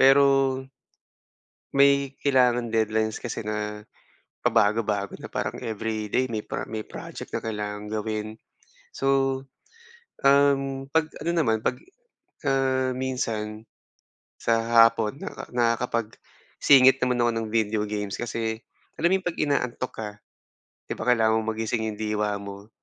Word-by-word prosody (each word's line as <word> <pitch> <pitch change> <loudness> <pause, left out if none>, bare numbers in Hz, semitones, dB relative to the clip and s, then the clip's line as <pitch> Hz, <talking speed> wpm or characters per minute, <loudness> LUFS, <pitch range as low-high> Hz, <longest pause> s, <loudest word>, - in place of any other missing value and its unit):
pero 135 0 +5 1.2
may 140 0 +4
kailangang 125 -4 +3
deadlines 110 -1 0
kasi 120 -2 -5
na 105 0 -4 0.6
pabago-bago 105 -1 +1
na - - -9
parang - - -2
everyday 110 +3 -1
may 110 -2 -3
pro - - -4
may 110 -1 -4
project - - -9
na - - -1
kailangang 105 -1 -4
gawin. 110 0 -3 0.7
So, 135 - -3 1.1
um, 135 -1 +3
'pag 160 -1 +2 0.2
ano 170 - +1
naman 115 -10 +1
'pag 125 - 0 0.7
ah, 130 -1 +1
minsan 115 -4 -3 0.8
sa 115 0 +4
hapon 115 +4 0
naka 200 - -6
nakakapag 115 -1 0 0.4
singit 130 -1 +7
naman 125 -1 +1
ako 120 - +3
ng 115 -1 -2
video 110 -1 +1
games, 105 -1 -3
kasi 115 -1 -3 0.4
alam 170 +3 +2
mo 190 - +3
yung 185 - -25
'pag 170 - -6
inaantok 130 -4 -1
ka, 110 -2 -5 0.8
'di - - -1
ba 115 - -5
kailangan 110 -2 +4
mong 110 - -3
magising 110 +1 -2
'yong 110 -1 -4
diwa 105 -1 0
mo, 100 +1 -9
115 Hz, 130 wpm, -25 LUFS, 110-130 Hz, 1.2 s, singit